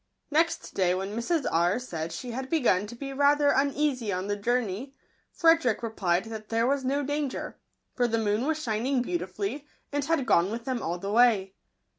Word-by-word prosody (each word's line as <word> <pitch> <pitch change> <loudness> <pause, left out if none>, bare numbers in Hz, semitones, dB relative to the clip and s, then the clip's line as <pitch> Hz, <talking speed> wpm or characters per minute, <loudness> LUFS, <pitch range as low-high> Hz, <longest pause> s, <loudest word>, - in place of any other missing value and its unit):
Next 325 +3 +1
day, 180 -2 +2
when 195 +3 -4
Mrs. 290 +6 0
R. 170 +4 +2
said 165 -10 -5
she 240 +9 -6
had 260 +2 -5
begun 225 - +2
to 240 - -9
be 275 +2 -6
rather 285 +1 +4
uneasy 275 -5 +1
on 185 0 -2
the 205 0 -1
journey, 240 +3 -2 0.4
Frederick 325 -10 +3
replied 190 -5 0
that 220 -1 -8
there 230 +1 +1
was 275 +1 +1
no 280 +3 0
danger; 290 -1 -3 0.3
for 245 -1 +1
the 230 -1 0
moon 220 +3 0
was 315 -1 +1
shining 245 0 0
beautifully, 195 - -3 0.2
and 290 0 -1
had 315 -4 +1
gone 185 -5 +3
with 230 +2 -5
them 255 -3 -2
all 170 +2 -2
the 195 +3 -4
way. 215 -5 +4
240 Hz, 185 wpm, -27 LUFS, 200-280 Hz, 0.4 s, rather